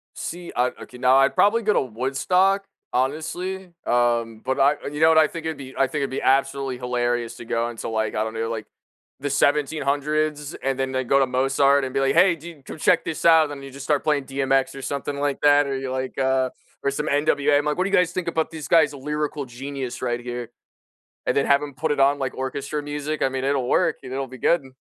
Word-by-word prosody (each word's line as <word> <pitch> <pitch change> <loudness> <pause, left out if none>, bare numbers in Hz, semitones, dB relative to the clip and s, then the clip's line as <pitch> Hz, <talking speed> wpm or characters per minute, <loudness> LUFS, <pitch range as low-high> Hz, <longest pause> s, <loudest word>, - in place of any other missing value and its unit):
See, 175 0 -6
uh, 125 +1 +2
okay 125 - -11
now 130 +1 +4
I'd 135 - +4
probably 230 +3 +3
go 210 0 +2
to - - +3
Woodstock, 160 - +1 0.3
honestly, 175 +8 -2 0.2
um, 120 -2 +1
but 130 +1 -1
I 140 +2 +5 0.2
you 150 - -5
know 160 - +6
what, 160 -1 +5
I 155 - +6
think 165 0 -7
it'd 160 -2 -2
be 135 -1 -10
I 135 - +3
think 150 +3 -3
it'd 135 - -1
be 130 - -3
absolutely 135 -1 +1
hilarious 120 -1 -1
to - - -9
go 115 +1 0
into, 115 0 -6
like, 110 -1 -1
I 110 - 0
don't 110 0 -4
know, 115 0 -2
like, 110 -2 -4 0.5
the 145 0 -3
1700's 150 +1 0
and 135 -1 -1
then 135 0 -1
they 130 0 -1
go 140 +3 +3
to 135 - +3
Mozart 135 +2 +3
and 130 - -6
be 135 - +1
like, 135 0 +2
"Hey, 185 -2 +5
dude, 160 -3 -12
come - - -7
check 175 +1 +3
this 160 - -4
out," 160 -1 +7
and 145 - -5
then - - -12
you 135 - -9
just 140 +1 -9
start 145 -1 +1
playing 150 -3 +1
DMX 135 0 0
or 135 - -8
something 140 +1 -3
like 145 -1 -1
that 145 0 +5
or 135 -1 -2
you're, 130 -1 -4
like, 130 0 -4
uh 130 -1 +1 0.3
or 140 - +2
some 150 +2 -3
NWA, 145 0 +2
I'm 145 - -1
like, 150 +3 -1
"What 185 - +2
do 195 - -2
you - - +3
guys 180 -1 +2
think 180 -2 -3
about 160 0 -1
these 160 -3 -7
guys 155 -4 +4
a 140 - -9
lyrical 150 0 -3
genius 130 0 -6
right 120 -1 -1
here." 120 -1 -6 0.8
And - - +1
then 140 - +2
have 140 0 +4
him 145 -2 -6
put 155 +4 -2
it 145 - 0
on 140 +1 +4
like 130 - -2
orchestra 140 +3 -3
music, 145 +1 -4
I - - +3
mean, 130 0 -3
it'll 135 -3 0
work, - - +2
it'll 135 +1 -4
be 130 0 -11
good. 135 -5 0
140 Hz, 245 wpm, -23 LUFS, 130-150 Hz, 0.8 s, out